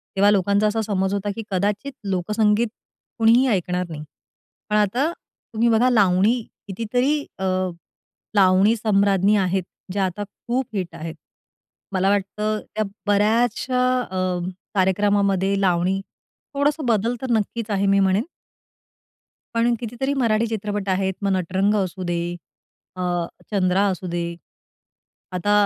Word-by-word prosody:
तेव्हा 200 +1 +5
लोकांचा 200 +1 +2
असा 220 +1 0
समज 195 -2 -1
होता 200 0 -2
की 225 - -5
कदाचित 205 +8 -1
लोकसंगीत 210 +4 +1 0.5
कुणीही 230 +3 +5
ऐकणार 180 -4 0
नाही. 150 -2 -6 0.7
पण 210 - +1
आता 235 - +2
तुम्ही 235 -6 -3
बघा 230 +3 +4
लावणी 210 +1 +3 0.3
कितीतरी 245 +9 0 0.2
अ, 190 - -3 0.9
लावणी 195 +2 +5
सम्राज्ञी 200 -2 +3
आहेत, 190 -1 +1 0.3
ज्या 195 0 +1
आता 185 +2 -3
खूप 245 +5 -3
हिट 180 -4 -3
आहेत. 165 0 -6 0.8
मला 190 0 +2
वाटतं 210 +2 -1
त्या 215 0 0 0.2
बऱ्याचश्या 230 +5 +2 0.2
अ, 185 -5 -2 0.4
कार्यक्रमामध्ये 195 0 +2
लावणी 185 0 +2 0.5
थोडंसं 290 +1 +1
बदल 230 +1 +1
तर 260 - -3
नक्कीच 225 0 -1
आहे 200 -1 +1
मी 195 0 +4
म्हणेन. 195 +3 +2 1.3
पण 235 +1 +3
कितीतरी 245 +4 -2
मराठी 225 -1 +2
चित्रपट 205 -2 -3
आहेत, 190 0 +1
मग 195 - +2
नटरंग 190 +3 +1
असू 190 -2 -2
दे, 170 - 0 0.8
अ, 185 - -5 0.5
चंद्रा 190 -1 +2
असू 185 -1 -4
दे. 175 0 -2 1.1
आता 185 +3 -1
205 Hz, 125 wpm, -22 LUFS, 190-225 Hz, 1.3 s, तेव्हा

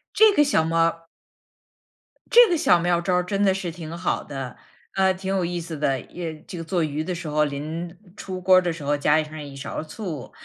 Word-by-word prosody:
这 440 -1 +7
个 295 -7 +4
小 275 - +2
妙 165 +1 -1
儿 165 0 +1 1.3
这 480 0 +9
个 345 - +2
小 180 - +4
妙 175 0 +2
招 180 0 +1
真 195 +3 -1
的 195 -1 +4
是 185 -3 -4
挺 165 -1 -8
好 170 +1 -1
的， 135 -3 -6 0.4
呃， 190 -1 +3
挺 190 +1 -4
有 185 -2 +1
意 175 0 -2
思 165 -1 -6
的。 135 -3 0
也 165 -3 -7
这 180 - -8
个 165 - -5
做 165 0 0
鱼 150 0 -2
的 180 - -3
时 170 -1 -6
候， 150 0 +2
临 155 +5 -5 0.2
出 185 -1 -6
锅 185 0 +5
儿 185 - +6
的 175 -1 -1
时 160 -3 -9
候 145 +1 +1
加 150 +2 +3
上 155 0 -9
一 140 -2 -9
勺 140 +1 -5
醋。 160 - -7
170 Hz, 240 characters per minute, -24 LUFS, 155-185 Hz, 1.3 s, 这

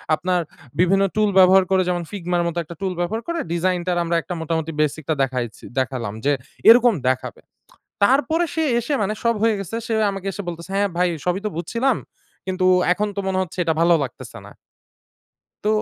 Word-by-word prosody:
আপনার 180 +2 0 0.4
বিভিন্ন 195 +2 +4
টুল 215 -1 +3
ব্যবহার 190 +1 +7
করে 190 -1 +4
যেমন 175 -1 -1
Figma 180 -3 -2
-র - - +1
মতো 170 0 -4
একটা 170 +2 -10
টুল 190 -1 -1
ব্যবহার 210 +6 -1
করে 340 0 -2
ডিজাইনটার 180 0 0
আমরা 170 0 -1 0.3
মোটামুটি 160 0 -2
বেসিকটা 155 +1 -1
দেখায়েছি 125 -3 -4 0.2
দেখালাম 130 -5 -2
যে 145 - +4 0.4
এরকম 240 0 +7
দেখাবে। 130 0 -2 0.6
তারপরে 290 +9 +3
সে 320 - +1 0.2
এসে 240 +6 -4
মানে 210 +2 -1
সব 235 0 +3
হয়ে 225 -1 +3
গেছে, 195 +3 -5
সে 225 - -1 0.2
আমাকে 195 -1 -7
এসে 200 - -5
বলতেসে 170 +1 -7
"হ্যাঁ 200 +1 +2
ভাই 180 0 +3 0.2
সবই 180 +2 0
তো - - -1
বুঝছিলাম। 230 +9 0 0.5
কিন্তু 185 0 0 0.3
এখন 210 +3 -1
তো - - 0
মনে 190 -1 0
হচ্ছে 185 -1 -8
এটা 165 - +2
ভালো 170 +1 +5
লাগতেসে 125 - -9
না।" - - -12 1.1
তো - - +1
185 Hz, 180 wpm, -21 LUFS, 170-210 Hz, 1.1 s, ব্যবহার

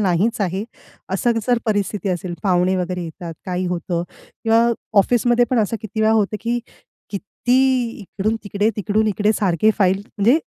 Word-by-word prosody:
नाहीच 195 +4 +1
आहे. 190 +1 -1 0.5
असं 200 +5 +2
जर 245 -2 +3
परिस्थिती 205 -2 -1
असेल 180 -1 -2
पाहुणे 185 0 +2
वगैरे 180 0 -2
येतात, 165 0 -7
काही 180 0 -1
होतं 175 -1 -2 0.4
किंवा 225 +1 +4 0.3
ऑफिसमध्ये 240 +3 +4
पण 255 - +2
असं 220 +1 +1
किती 220 0 -5
वेळा 220 0 +4
होतं, 215 -1 +1
की 235 +2 0 0.5
किती 245 +4 +1
इकडून-तिकडे, 210 +1 -1
तिकडून-इकडे 210 0 +1
सारखे 205 0 +2
फाईल 190 -1 +3
म्हणजे 230 +8 +3
205 Hz, 145 wpm, -20 LUFS, 185-225 Hz, 0.5 s, किंवा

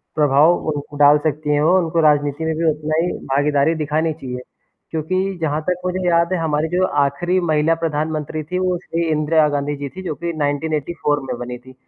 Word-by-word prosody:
प्रभाव 150 +3 +4
उनको 145 -1 -4
डाल 145 0 +6
सकती 150 0 -2
हैं 145 - +2
वो, 175 +5 +4
उनको 165 -1 0
राजनीति 145 0 +2
में 160 -1 -1
भी 165 - -1
उतना 155 +1 -3
ही 180 - -1
भागीदारी 145 +3 +2
दिखानी 155 +1 -1
चाहिए। 125 -5 -7 0.5
क्योंकि 185 +4 -1
जहाँ 155 0 0
तक 180 0 -1
मुझे 185 0 -1
याद 170 0 +3
है, 185 - +1
हमारी 155 -1 0
जो 180 +2 +2 0.2
आख़िरी 175 +7 0
महिला 160 -1 +2
प्रधानमंत्री 155 -1 -2
थी, 180 +5 -3
वो 185 -1 0
श्री 170 -1 -3
इंदिरा 155 0 +3
गांधी 145 0 -2
जी 140 -1 -5
थी, 190 - -9
जो 165 -5 -3
कि 170 +2 -4
1984 145 0 -1
में 125 -2 -3
बनी 125 0 -5
थी। 130 +1 -16
155 Hz, 195 wpm, -20 LUFS, 145-170 Hz, 0.5 s, डाल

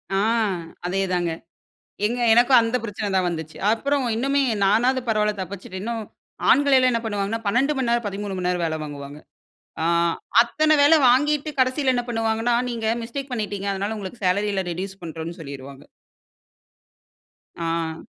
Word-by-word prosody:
ஆ. - - +2 0.7
அதே 195 +2 0
தாங்க. 175 -2 0 0.7
எங்க 240 +3 -1
எனக்கும் 245 +1 +6
அந்த 230 +2 0
பிரச்சனை 210 -1 -4
தான் 185 -1 +2
வந்துச்சு. 160 -2 -6
அப்புறம் 275 +4 0
இன்னுமே 275 +4 +1 0.2
நானாவது 245 +6 +3
பரவாயில்ல 210 -1 +1
தப்பிச்சுட்டேன். 190 0 -7
இன்னும் 230 0 -3 0.5
ஆண்கள் 280 +1 +5
எல்லாம் 255 -1 +4
என்ன 230 - 0
பண்ணுவாங்கன்னா? 205 +1 -2
12:00 265 +8 +2
மணி 260 -3 0
நேரம் 235 -1 +1
13:00 200 -1 -4
மணி 180 -1 -2
நேரம் 180 -1 0
வேல 160 -1 -2
வாங்குவாங்க. 145 0 -8 0.6
ஆ - - +1 0.6
அத்தன 310 +6 +2
வேலை 300 +3 +6
வாங்கிட்டு 295 +4 +2
கடைசில 260 +1 +2
என்ன 245 -1 0
பண்ணுவாங்கன்னா? 225 +1 0
நீங்க 230 -2 -4 0.2
மிஸ்டேக் 265 +4 -6
பண்ணிட்டீங்க, 205 -4 -3
அதனால 200 +3 -3
உங்களுக்கு 200 +1 -8
சேலரில 200 +1 +1
ரெட்யூஸ் 195 +3 -5
பண்றோன்னு 165 +1 -6
சொல்லிருவாங்க. 140 -2 -9 1.7
ஆ. 165 -1 -3
215 Hz, 145 wpm, -23 LUFS, 180-245 Hz, 1.7 s, எனக்கும்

